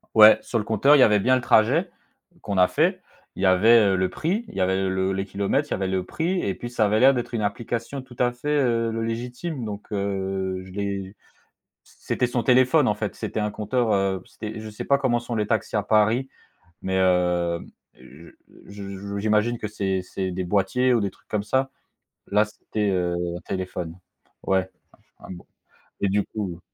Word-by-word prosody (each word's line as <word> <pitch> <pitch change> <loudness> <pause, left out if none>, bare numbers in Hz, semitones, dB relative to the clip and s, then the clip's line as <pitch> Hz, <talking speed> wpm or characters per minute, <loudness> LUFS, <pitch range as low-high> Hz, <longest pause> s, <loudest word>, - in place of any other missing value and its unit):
Ouais, 110 0 +9
sur 115 - -1
le - - -2
compteur, 115 +7 +4
il - - +4
y - - +7
avait 105 -1 +4
bien 130 +6 +3
le 130 - 0
trajet 115 -3 +3 0.5
qu'on 100 -2 -3
a 90 - +6
fait. - - +1 0.3
Il - - -6
y 100 - +4
avait, 110 +6 +6
heu, 100 -3 +3
le 95 0 0
prix, 195 +9 -2
il - - -12
y 95 - -1
avait 95 +1 +1
le 95 0 0
les 95 0 -2
kilomètres, 100 +10 -1
il - - -21
y - - +2
avait 95 0 -1
le 95 -1 -1
prix 175 - -1
et 100 - -1
puis 120 - -7
ça 120 -3 +1
avait 105 +1 +2
l'air 135 +2 +6
d'être 120 0 -4
une 115 - -1
application 120 +5 -3
tout 125 -1 -15
à 125 -1 +3
fait, 145 +5 -1
heu, 115 -3 +1
le 115 0 -3
légitime, 125 +5 -4
donc 105 0 -7
heu, 95 -2 -2
je 95 - -12
l'ai 100 0 -4 0.7
c'était 125 - -2
son 120 -1 -1
téléphone, 130 +3 +4
en 105 - +2
fait, 105 -2 -3
c'était - - -4
un 105 0 -1
compteur, 110 +2 0
heu, 95 -2 0
c'était 110 0 -8
je 110 0 -7
sais 105 - -7
pas 140 - +3
comment 125 -3 +1
sont 120 0 -5
les 105 -1 -1
taxis 110 0 -1
à 105 - 0
Paris. 110 +5 +2 0.6
Mais, 95 0 -1
heu, 90 -2 +1 0.3
je 65 +6 -15 0.4
je 100 0 -7
j'imagine 110 +3 +1
que 110 - -4
c'est 95 -3 -2
c'est 95 0 -4
des 90 +1 -3
boîtiers 105 +7 +1
ou 115 - +2
des 100 -1 -1
trucs - - -28
comme 105 -1 -1
ça? 130 +5 0 0.6
Là 105 +1 +3
c'était, 105 0 -3
heu, 90 -2 0 0.2
un - - -8
téléphone. 90 -2 -5 0.5
Ouais 95 -1 +1 0.5
un - - -13
un - - -6
bo 90 -1 -11 0.5
et 100 - +1
du 100 +1 +1
coup 95 -6 -5
105 Hz, 210 wpm, -24 LUFS, 95-120 Hz, 0.7 s, Ouais